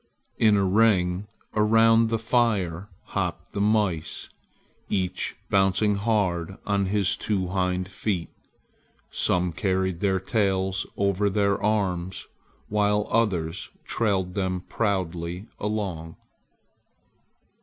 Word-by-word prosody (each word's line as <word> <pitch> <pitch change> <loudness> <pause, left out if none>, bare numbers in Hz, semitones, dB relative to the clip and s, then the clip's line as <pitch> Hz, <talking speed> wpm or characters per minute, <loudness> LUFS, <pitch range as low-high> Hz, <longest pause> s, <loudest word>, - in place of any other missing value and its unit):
In 110 -2 +5
a 100 - +2
ring 95 -2 +2 0.3
around 115 +1 +4
the 115 - +1
fire 105 -6 0 0.2
hopped - - -3
the 100 - -2
mice, 100 -7 0 0.6
each 90 -2 -1 0.2
bouncing 95 +1 +3
hard 100 -4 0
on 100 -2 +1
his 100 -1 +1
two 95 -4 -1
hind 90 -1 0
feet. 95 -2 -2 0.8
Some 90 -1 +1
carried 95 -1 0
their 95 -1 +1
tails 95 -2 0
over 100 0 +2
their 100 0 +1
arms, 95 -4 -1 0.4
while 105 0 +1
others 95 -7 0 0.2
trailed 95 -5 0
them 95 -2 -1
proudly 90 -3 -2
along. 95 -6 -3
95 Hz, 100 wpm, -25 LUFS, 90-105 Hz, 0.8 s, In